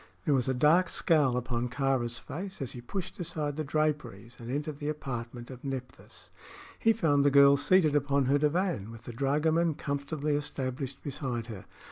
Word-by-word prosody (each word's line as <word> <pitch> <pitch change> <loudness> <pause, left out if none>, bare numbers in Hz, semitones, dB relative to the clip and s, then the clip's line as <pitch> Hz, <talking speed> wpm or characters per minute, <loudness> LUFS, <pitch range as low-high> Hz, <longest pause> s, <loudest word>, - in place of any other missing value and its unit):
There 150 - +3
was 130 -2 +1
a 130 - +1
dark 165 +7 +4
scowl 145 -7 +2
upon 125 -1 -2
Kāra's 125 -3 0
face 190 +5 -7
as 135 -3 -3
he 125 - -8
pushed 185 +10 -6
aside 155 -4 -2
the 155 - -2
draperies 140 -7 -2
and 120 0 -8
entered 145 +2 -3
the 145 -1 -2
apartment 120 -4 -5
of 125 -1 -11
Nephthys. 130 -2 -7 0.5
He 225 - +4
found 155 -10 +2
the 145 - +5
girl 140 0 +7
seated 155 +1 +3
upon 140 -1 +2
her 140 +3 +3
divan, 150 - 0
with 115 -1 -11
the 120 - -8
dragoman 155 +5 +1
comfortably 140 +1 -2
established 135 -2 -4
beside 130 -5 -3
her. 95 - -10
140 Hz, 175 wpm, -29 LUFS, 125-155 Hz, 0.5 s, girl